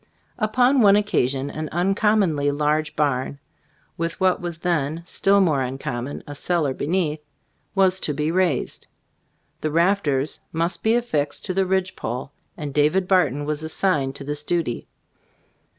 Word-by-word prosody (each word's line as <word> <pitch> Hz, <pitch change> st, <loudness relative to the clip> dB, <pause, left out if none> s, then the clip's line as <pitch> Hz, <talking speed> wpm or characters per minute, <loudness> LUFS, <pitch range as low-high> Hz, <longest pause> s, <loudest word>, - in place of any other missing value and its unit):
Upon 245 Hz, +4 st, +3 dB
one 200 Hz, -2 st, +7 dB
oc 210 Hz, -, +1 dB
casion, 135 Hz, -6 st, 0 dB
an 155 Hz, -1 st, -5 dB
uncommonly 185 Hz, -4 st, +2 dB
large 150 Hz, +2 st, 0 dB
barn, 140 Hz, -2 st, 0 dB, 0.6 s
with 165 Hz, 0 st, -2 dB
what 185 Hz, -1 st, +2 dB
was 175 Hz, -2 st, -4 dB
then 165 Hz, -2 st, -1 dB
still 200 Hz, +2 st, +3 dB
more 155 Hz, -7 st, +2 dB
uncom 130 Hz, -1 st, -3 dB
mon, 140 Hz, -, -7 dB
a 145 Hz, -, -7 dB
cellar 150 Hz, -1 st, 0 dB
beneath, 155 Hz, +1 st, -1 dB, 0.6 s
was 190 Hz, -1 st, +3 dB
to 150 Hz, -, -1 dB
be 150 Hz, +2 st, 0 dB
raised. 175 Hz, -7 st, 0 dB, 0.7 s
The 155 Hz, -, 0 dB
rafters 160 Hz, -4 st, +1 dB
must 165 Hz, +3 st, -1 dB
be 220 Hz, +1 st, +3 dB
affixed 150 Hz, -12 st, -1 dB
to 185 Hz, -, -2 dB
the 190 Hz, 0 st, +1 dB
ridge 190 Hz, 0 st, 0 dB
pole, 125 Hz, +4 st, -5 dB, 0.3 s
and 145 Hz, -2 st, -5 dB
David 155 Hz, +6 st, +2 dB
Barton 145 Hz, -7 st, +2 dB
was 150 Hz, 0 st, -2 dB
assigned 160 Hz, -4 st, 0 dB
to 140 Hz, -, -7 dB
this 145 Hz, +1 st, -4 dB
duty. 165 Hz, -8 st, -2 dB
160 Hz, 150 wpm, -23 LUFS, 145-190 Hz, 0.7 s, one